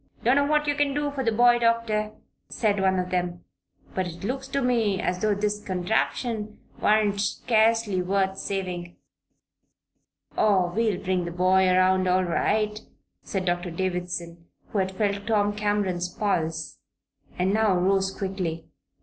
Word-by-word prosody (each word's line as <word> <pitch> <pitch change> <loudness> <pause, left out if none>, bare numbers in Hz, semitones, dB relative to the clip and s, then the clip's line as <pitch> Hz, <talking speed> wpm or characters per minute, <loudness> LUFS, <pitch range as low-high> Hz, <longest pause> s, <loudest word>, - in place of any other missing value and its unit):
"Dunno 275 +4 +3
what 300 0 +2
you 290 - +1
can 285 -1 0
do 290 0 -1
for 275 -2 -3
the 230 - +1
boy, 240 +2 +5
Doctor," 230 -2 +1 0.4
said 205 -3 0
one 190 0 +2
of 180 0 -2
them; 175 -1 -2 0.5
"but 185 -1 -1
it 175 +1 -9
looks 265 +5 -3
to 275 +1 -1
me 230 -7 +1
as 180 0 -2
though 215 -1 +2
this 210 +1 -2
contraption 210 +3 -2 0.2
warn't 210 -1 +3
scurcely 220 -2 +2
wuth 190 +1 0
savin'." 180 -3 -4 1.4
"Oh, 190 -5 +2
we'll 220 -4 +1
bring 185 -1 -1
the 170 - -4
boy 185 +2 +3
around 185 0 +3
all 185 +1 +3
right," 210 +4 0 0.4
said 190 -2 -3
Doctor 175 0 -1
Davison, 175 -1 -4 0.2
who 205 - -1
had 190 0 0
felt 200 -1 -1
Tom 205 -2 +1
Cameron's 205 -4 -1
pulse 165 -5 -2 0.6
and 185 +2 +1
now 215 -3 +3
rose 190 +1 +2
quickly. 190 -5 -4
195 Hz, 150 wpm, -25 LUFS, 180-220 Hz, 1.4 s, boy